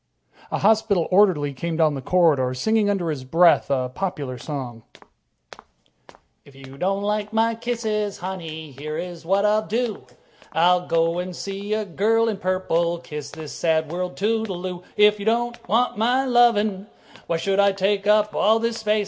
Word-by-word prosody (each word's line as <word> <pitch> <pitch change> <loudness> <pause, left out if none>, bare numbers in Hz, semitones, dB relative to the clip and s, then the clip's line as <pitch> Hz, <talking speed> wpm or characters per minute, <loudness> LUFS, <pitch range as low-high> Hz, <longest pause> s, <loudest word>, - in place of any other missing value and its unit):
A - - -2
hospital 215 -4 +2
orderly 180 -8 +3
came 165 +4 -4
down 155 -2 +3
the 135 - -5
corridor, 140 -6 +2
singing 215 +9 +1
under 180 -5 -1
his 140 -4 -5
breath 165 +6 +4
a 130 -2 -1
popular 140 -8 -4
song: 125 -6 -6 1.6
If 140 - -19
you 135 0 -12
don't 195 +6 -1
like 210 0 -2
my 225 +1 +2
kisses, 220 -3 -2
honey, 165 -4 -7
Here's 160 +5 -6
what 195 +2 +2
I 210 +1 +3
will 215 - -8
do: 220 - -2 0.5
I'll 180 +2 +3
go 170 +2 0
see 200 +3 -4
a 215 -1 -2
girl 225 +5 +1
in 215 - -3
purple, 175 -2 0
Kiss 150 -4 -8
this 155 0 -9
sad 160 -2 0
world 180 +1 -4
toodle 210 -3 -1
oo. 180 -1 -5 0.2
If 210 0 +5
you 200 - -6
don't 235 -1 -1
want 235 +1 +1
my 250 +4 +2
lovin', 215 -5 +2 0.4
Why 170 - 0
should 195 +4 -1
I 200 0 +5
take 195 +1 0
up 210 0 +3
all 220 +2 +3
this 230 0 -2
space? 215 -1 +1
190 Hz, 165 wpm, -23 LUFS, 165-215 Hz, 1.6 s, If